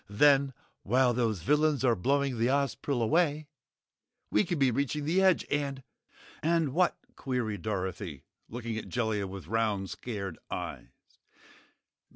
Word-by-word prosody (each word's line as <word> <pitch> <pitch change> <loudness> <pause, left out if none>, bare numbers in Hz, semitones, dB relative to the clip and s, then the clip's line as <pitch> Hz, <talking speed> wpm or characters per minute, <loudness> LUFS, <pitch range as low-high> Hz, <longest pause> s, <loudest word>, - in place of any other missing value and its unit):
Then, 140 +5 +4 0.3
while 125 +3 +3
those 110 -7 0
villains 150 - +2
are 120 -2 +4
blowing 135 +3 0
the 115 - +3
Ozpril 140 -2 0
away, 155 +3 +2 0.9
we 105 - +4
can 175 - -2
be 135 -3 +3
reaching 140 +4 -1
the 175 +5 +2
edge 190 -3 +4
and 140 -2 -1 0.3
" - - -27 0.2
"And 165 -4 +1
WHAT?" 175 +1 +2 0.2
queried 120 -7 -2
Dorothy, 95 -7 -4 0.3
looking 115 -1 -4
at - - -9
Jellia 110 -5 -1
with 95 -1 -8
round, 105 -1 -1
scared 100 -7 -5
eyes. - - -5
125 Hz, 140 wpm, -30 LUFS, 105-145 Hz, 0.9 s, Then